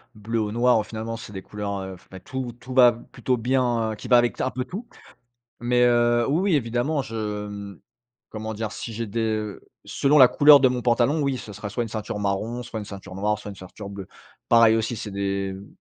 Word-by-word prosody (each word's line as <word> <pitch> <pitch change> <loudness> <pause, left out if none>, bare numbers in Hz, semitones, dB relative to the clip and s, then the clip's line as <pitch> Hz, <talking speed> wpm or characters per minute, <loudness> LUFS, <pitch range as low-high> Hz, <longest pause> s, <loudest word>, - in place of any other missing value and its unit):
bleu 110 +2 -3
ou 105 -1 -1
noir, 120 0 +3
au - - -1
finalement, 115 +1 -5
c'est 110 - -10
des 95 -1 -7
couleurs 100 -2 -5
f - - -25
beh, 95 - -9
tout 130 +5 -5
tout 130 +1 -8
va 125 -2 +7
b 115 - -13
plutôt 125 0 -1
bien, 120 -2 +1
heu - - -4
qui 105 - -9
va 125 - +6
avec 120 0 +1
un 130 - +1
peu 125 0 -4
tout. 200 - -7 0.7
Mais, 120 +1 +3
heu, 120 -1 +3
oui, 150 +5 +2
oui - - +6
évidemment, 125 +4 0
je, 105 -4 -4
mmh, 100 -2 -8 0.5
comment 110 0 -5
dire? 110 0 -4
Si 115 - -6
j'ai 115 +1 -4
des, 110 +3 -3
heu 110 -2 -2 0.2
selon 145 +2 +2
la 130 - +10
couleur 145 +2 +8
de 130 - +5
mon 125 -1 -2
pantalon, 125 +6 +2
oui. 140 -2 0
Ce 105 - -9
sera 105 +1 -6
soit 120 +4 -2
une - - -7
ceinture 105 -1 -4
marron, 105 +5 -2
soit 110 -2 -6
une - - -6
ceinture 95 -2 -9
noire, 105 +2 0
soit 105 - -8
une 100 - -10
ceinture 95 +2 -10
bleue. 100 -1 -8 0.4
Pareil 115 -1 +6
aussi 115 +1 -1
c'est 105 -2 -6
des, 100 0 -2
mmh 100 +1 -10
115 Hz, 235 wpm, -24 LUFS, 105-125 Hz, 0.7 s, la